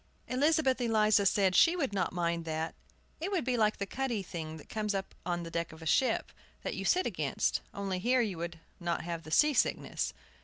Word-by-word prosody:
Elizabeth 270 0 +2
Eliza 215 -3 +4
said 190 -2 +3
she 335 +1 +6
would 275 - -1
not 195 - 0
mind 170 -1 -1
that. 160 0 -3 0.5
It 345 - -2
would 365 -6 0
be 255 -1 +1
like 215 -2 +2
the 200 - -2
cuddy 240 -2 -2
thing 160 -3 -6
that 150 - -13
comes 210 -2 -2
up 190 0 -3
on 175 -1 -1
the 165 - -7
deck 170 0 -2
of 160 +1 -11
a - - -8
ship, 255 - +2 0.3
that - - -2
you - - -4
sit 370 +1 +3
against, - - 0
only 195 -2 -3
here 245 +6 +3
you 200 -7 -2
would 170 -1 -5 0.2
not 170 -1 -1
have 170 -1 -4
the 155 - -11
sea 300 - +5
sickness. - - 0
200 Hz, 215 wpm, -31 LUFS, 170-255 Hz, 0.5 s, she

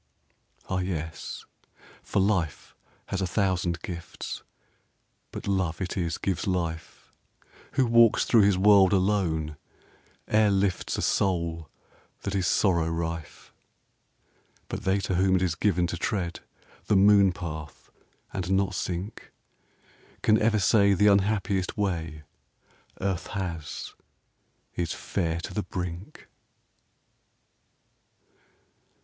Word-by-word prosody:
Ah, 95 - -1
yes, 85 -3 -5 0.6
for - - -1
life 95 -7 -1 0.3
has 95 - -2
a 95 - 0
thousand 90 -3 0
gifts, 85 -2 -6 0.9
But - - -8
love 95 -5 0
it 95 -2 -3
is 85 -3 -1
gives 95 -2 -2
life. 85 -3 -4 0.6
Who 135 -1 +3
walks 115 -1 +5
thro 115 - +5
his 100 -2 +4
world 100 -1 +6
alone 90 -6 0 0.7
e'er 110 0 +4
lifts 100 -2 0
A - - -2
soul 85 -5 0 0.5
that 100 - -3
is 95 -3 0
sorrow 85 -5 +2
rife. 80 -1 -5 1.2
But - - -5
they 95 +1 +3
to 95 - -2
whom 95 +1 +3
it 95 - +2
is 90 -3 +1
given 90 0 +1
to 85 - -3
tread 85 -1 -2 0.5
The 105 - +2
moon 100 0 +6
path 80 -4 -8 0.4
and 95 -2 -3
not 95 0 +1
sink 90 +3 -5 0.9
Can 110 0 +4
ever 110 0 +3
say 100 0 +4
the 105 +3 +3
unhappiest 100 -1 0
way 80 -6 -2 0.8
Earth 95 -2 -2
has 85 -7 -5 0.8
is 85 -2 -2
fair 85 -4 -2
to - - -7
the 105 - -1
brink. 90 0 -6
95 Hz, 115 wpm, -27 LUFS, 85-100 Hz, 1.2 s, world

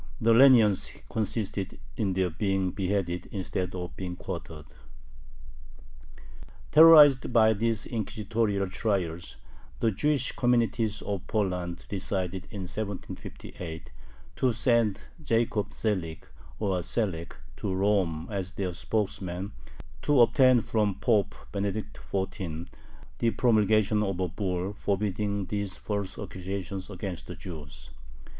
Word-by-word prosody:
The 115 +1 +4
leniency 115 -5 +5
consisted 105 -3 -2 0.2
in 100 -3 0
their 95 -1 +1
being 95 +1 0
beheaded 90 -2 -1
instead 95 -2 -3
of 90 -1 -5
being 90 -2 -5
quartered. 80 -3 -7 2.1
Terrorized 150 -5 +8
by 110 -2 +5
these 110 0 0
inquisitorial 110 -2 -1
trials, 90 -4 -2 0.4
the 115 - +2
Jewish 135 +5 +1
communities 115 -3 +1
of 100 -2 -4
Poland 90 -5 -2
decided, 95 -1 -3
in 105 -3 -6
1758, 90 -3 -7 0.5
to 130 - +3
send 115 -3 +2 0.2
Jacob 115 -6 0
Zelig 90 -7 -2 0.3
(or 95 -4 0
Selek) 90 -3 -2 0.2
to 100 - -3
Rome 95 -5 +1
as 95 -2 -3
their 95 -3 -2
spokesman, 95 -1 -2 0.5
to 145 -4 +4
obtain 125 +1 +5
from 105 -3 0
Pope 105 0 +1 0.2
Benedict 100 +1 -3
XIV. 90 -4 -3 0.5
the 115 - +3
promulgation 110 -2 +3
of 95 -3 -1
a 90 - +1
bull 90 +1 -2
forbidding 100 0 -1
these 100 0 -3
false 100 -2 -4
accusations 95 0 -5
against 95 -3 -5
the - - -7
Jews. 75 -5 -9
100 Hz, 110 wpm, -28 LUFS, 90-110 Hz, 2.1 s, Terrorized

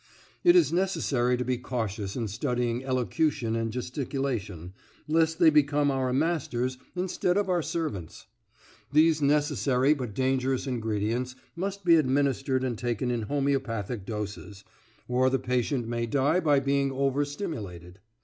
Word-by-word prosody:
It 350 0 +6
is 345 - +4
necessary 155 -10 +1
to 125 - -2
be 125 0 -1
cautious 110 -6 -3
in 115 -3 -2
studying 120 +2 -1
elocution 130 -2 0
and 115 -1 -1
gesticulation, 125 - -4 0.3
lest 160 +1 +2
they 165 -2 +6
become 145 -1 +3
our 130 -1 0
masters 130 -4 -1 0.2
instead 180 0 0
of 205 -2 0
our 175 -2 +2
servants. 110 - -4 0.7
These 155 +1 +4
necessary 145 -2 +2
but 125 -8 -5
dangerous 130 0 0
ingredients 115 0 -2 0.2
must 195 +2 -4
be 170 -1 +7
administered 135 -2 +1
and 120 -4 -2
taken 120 0 -1
in 120 -1 -1
homeopathic 130 -7 -1
doses, 105 -1 -6 0.4
or 125 +1 +2
the 135 - +1
patient 125 -1 -1
may 120 0 -2
die 140 +8 +2
by 150 -5 +3
being 140 0 +1
over 135 +1 +1
stimulated. 105 - -6
130 Hz, 140 wpm, -27 LUFS, 120-145 Hz, 0.7 s, be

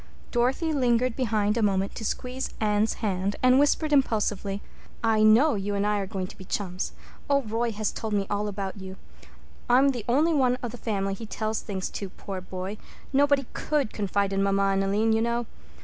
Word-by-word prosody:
Dorothy 265 +7 +1
lingered 250 -3 +2
behind 215 -4 +1
a - - +1
moment 195 -2 +1
to - - -7
squeeze 255 +4 -3
Anne's 210 0 +2
hand 195 0 0
and 255 +1 +6
whisper 290 +2 +3
impulsively. 210 -7 +1 0.4
"I 220 -1 +3
know 230 +8 +6
you 205 0 -2
and 200 +1 0
I 210 0 +1
are 195 - -3
going 190 -2 -3
to - - -12
be - - -8
chums. 185 -1 -3 0.4
Oh, 280 -1 +3
Roy 230 +1 -1
has 210 0 -1
told 220 -1 -4
me 200 -1 +1
all 205 +1 -1
about 195 -1 -4
you. 190 0 -7 0.7
I'm 260 +3 +6
the 245 -5 -2
only 305 +7 +3
one 255 -4 +3
of 240 - -3
the 245 - -8
family 195 -3 -1
he 220 +3 -7
tells 215 0 -2
things 190 -2 -4
to, 200 - -5
poor 190 0 -7
boy—nobody 255 +9 -1
could 295 -7 -1
confide 200 -1 0
in 195 - +1
mamma 195 0 +2
and 195 0 +1
Aline, 210 +3 +2
you 220 - +2
know. 235 +1 0
215 Hz, 195 wpm, -26 LUFS, 195-245 Hz, 0.7 s, and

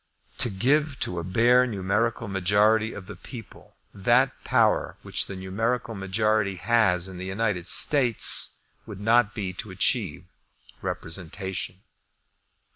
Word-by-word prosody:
To - - +3
give 140 +7 0
to 90 - -1
a - - -5
bare 120 +7 +3
numerical 110 +2 -1
majority 105 +3 +2
of 95 - -9
the 105 +1 -9
people 115 +4 -12 0.2
that 120 +7 +2
power - - +1
which - - -1
the 100 - -7
numerical 110 +5 -2
majority 100 0 0
has 95 -3 +1
in 95 -2 -9
the 95 - -6
United 95 -3 -2
States, 125 -3 +4 0.2
would 105 -3 -9
not 110 0 +2
be 95 -4 -4
to 100 - -7
achieve 95 - -1 0.6
representation. 95 +2 -5
105 Hz, 125 wpm, -25 LUFS, 95-115 Hz, 0.6 s, States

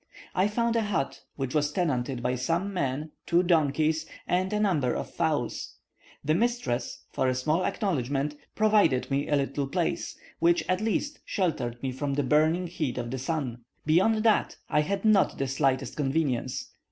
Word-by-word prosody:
I 185 +2 +3
found 235 +2 0
a 230 - +3
hut, 205 -10 -2
which 135 -2 -3
was 150 -1 +1
tenanted 135 -7 -1
by 125 +1 +1
some 165 +10 -1
men, 145 -2 -2 0.2
two 175 +1 +4
donkeys, 155 -1 +2 0.2
and 185 +1 0
a 210 - 0
number 155 - +2
of - - -4
fowls. 155 -8 -1 0.5
The 155 - +3
mistress, 235 - -1
for 130 - 0
a 130 - +1
small 155 +8 +1
acknowledgment, 145 - -1 0.2
provided 205 -13 +3
me 140 +1 0
a 150 - +3
little 140 0 -1
place, - - -2 0.2
which 170 +1 +3
at 185 +2 +1
least 285 +7 -1
sheltered 130 - -2
me 130 - -1
from 140 +2 -2
the 145 - +1
burning 155 +6 +3
heat 155 -8 -3
of 120 -1 -3
the 130 - -3
sun. 130 -4 -3 0.2
Beyond 190 +8 +3
that, 220 -2 +2
I 150 - +4
had 195 +6 -2
not 215 -3 +4
the 135 - -1
slightest 130 0 0
convenience. 135 -4 -1
150 Hz, 170 wpm, -28 LUFS, 135-185 Hz, 0.5 s, two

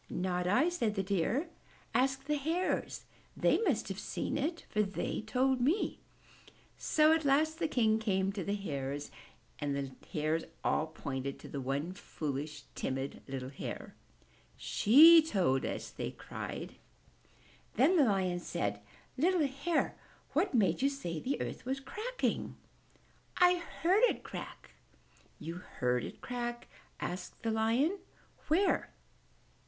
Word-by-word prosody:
"Not 180 -1 -1
I," 250 - +4
said 235 -12 -1
the 195 - 0
Deer. 200 - 0 0.5
"Ask 265 +1 +2
the 300 +2 0
Hares! 330 +6 -1 0.3
They - - +3
must 325 - +1
have 195 +1 -4
seen 265 - -3
it, 310 +4 -2
for 210 - +1
they 200 0 -2
told 250 +4 +1
me!" 315 - +1 0.8
So 310 0 +4
at 320 0 +1
last 310 +3 +2
King 235 -6 +3
Lion 220 +1 +3
came 195 -3 +1
to 195 -2 -4
the 200 +4 -1
Hares 145 -7 -4 0.5
and 145 -1 -1
the 140 -1 -3 0.2
Hares 155 +1 0 0.2
all 155 - +1
pointed 140 -3 -4
to - - -11
the 140 - -5
one 140 +7 -2
foolish, 150 -5 -5
timid, 135 +1 -3
little 130 -1 -4
Hare. 135 - -6 0.6
"She 320 +9 +8
told 185 - +1
us," - - -4
they - - -4
all - - -14
cried. - - -6 1.0
Then 285 - +5
the 315 - +6
Lion 190 -5 +1
said, 100 -11 -2 0.4
"Little 345 0 +3
Hare, 280 +5 0 0.4
what 330 +2 +1
made 195 -5 +3
you 275 - +4
say 175 - -4
the 270 - -2
earth - - -4
was 265 +2 -2
cracking?" 440 - -2 0.8
"I 360 0 +6 0.3
heard 375 +6 +5
it - - -1
crack." - - -8 0.7
"You 165 +2 -6
heard 125 -8 -1
it - - -8
crack?" 240 -1 -4 0.3
said 180 +1 -4
the 225 - +1
Lion. 235 - +2 0.5
"Where?" 360 +6 +2
220 Hz, 140 wpm, -33 LUFS, -, 1.0 s, She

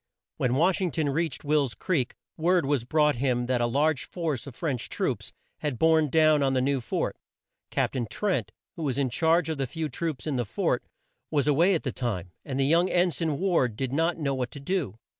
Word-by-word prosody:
When 125 0 +1
Wash 180 +7 +3
ing 185 - +1
ton 155 -1 -1
reached 160 +4 -1
Will's 145 -4 +1
Creek 145 -10 -1 0.2
word 175 0 +2
was 135 -4 0
brought 150 0 +2
him 125 -1 +1
that 125 -1 0
a 120 - +2
large 145 +3 +1
force 155 -7 -3
of 130 - -9
French 135 -7 -2
troops - - -2 0.3
had 145 -5 -2
borne 160 0 +4
down 155 0 +4
on 135 -1 +2
the - - +3
new 135 0 +1
fort. - - -2 0.5
Cap - - 0
tain 120 -3 -2
Trent, 205 -3 -1 0.2
who 170 - -7
was 140 -4 -1
in 135 -3 0
charge 165 +5 +3
of 160 -3 -3
the 135 - 0
few 155 +4 -3
troops 150 -1 -3
in 150 -4 -1
the 120 - +1
fort, 105 - -1 0.5
was 145 -2 +1
a 150 - +5
way 175 +6 +4
at 165 - -2
the 130 - -2
time, 100 -9 -3
and 135 -1 -4
the 135 - +3
young 170 +5 +3
En 180 0 +3
sign 155 -2 -1
Ward 165 - +1
did 130 +3 -3
not 165 +4 +1
know 145 -4 -1
what 125 -2 -2
to 145 - -9
do. 140 - -2
145 Hz, 225 wpm, -27 LUFS, 130-165 Hz, 0.5 s, a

